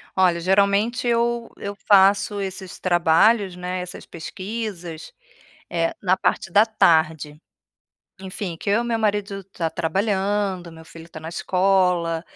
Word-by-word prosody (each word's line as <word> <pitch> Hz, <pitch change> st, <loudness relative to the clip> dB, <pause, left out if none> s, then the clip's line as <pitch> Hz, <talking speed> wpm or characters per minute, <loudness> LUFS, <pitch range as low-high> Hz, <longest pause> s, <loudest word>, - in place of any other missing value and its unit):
Olha, 180 Hz, -2 st, +3 dB
geralmente 200 Hz, +6 st, +2 dB
eu 235 Hz, 0 st, 0 dB
eu 200 Hz, -, -5 dB
faço 200 Hz, +1 st, +4 dB
esses 190 Hz, -1 st, -7 dB
trabalhos, 185 Hz, +3 st, +3 dB
né, 180 Hz, +1 st, -4 dB
essas 180 Hz, 0 st, -8 dB
pesquisas, 185 Hz, -2 st, -7 dB, 0.6 s
eh, 165 Hz, -1 st, -1 dB
na 185 Hz, -1 st, +2 dB
parte 175 Hz, -, -1 dB
da 205 Hz, +5 st, +5 dB
tarde. 160 Hz, -8 st, +1 dB, 0.8 s
Enfim, 190 Hz, -2 st, -5 dB
que -, -, -6 dB
eu 210 Hz, +4 st, +2 dB
e -, -, -6 dB
meu 235 Hz, -1 st, -1 dB
marido 205 Hz, -2 st, -1 dB
tá 170 Hz, -4 st, -4 dB
trabalhando, 190 Hz, +1 st, -1 dB
meu 160 Hz, 0 st, -13 dB
filho 165 Hz, 0 st, -13 dB
está 165 Hz, -2 st, -11 dB
na 160 Hz, -, -7 dB
escola, 180 Hz, -3 st, +1 dB
190 Hz, 135 wpm, -22 LUFS, 170-205 Hz, 0.8 s, da